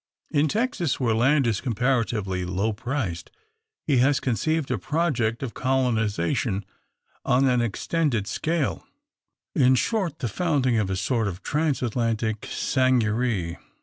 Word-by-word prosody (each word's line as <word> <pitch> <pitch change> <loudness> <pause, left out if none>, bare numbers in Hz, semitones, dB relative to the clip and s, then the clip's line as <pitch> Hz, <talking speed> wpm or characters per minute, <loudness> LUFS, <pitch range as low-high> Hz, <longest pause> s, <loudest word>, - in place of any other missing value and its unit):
In 150 +1 +3
Texas, 195 - -1
where 120 -4 +2
land 135 +5 +3
is 115 -4 0
comparatively 115 -6 0
low 95 +5 -1
priced, 110 - -3 0.6
he 140 -4 +2
has 135 +3 +3
conceived 145 +4 -1
a 120 - 0
project 125 - 0
of 125 - -4
colonisation, 110 -6 0 0.6
on 130 +2 +3
an 125 -2 +3
extended 120 0 0
scale 160 +6 -1 0.7
in 130 -6 +4
short, 180 - 0
the 120 - -2
founding 130 - +1
a 95 -3 -1
sort 110 +3 0
of 90 -2 -6
Transatlantic 115 -7 -1
seigneurie. 115 -8 +1
125 Hz, 120 wpm, -25 LUFS, 110-140 Hz, 0.7 s, in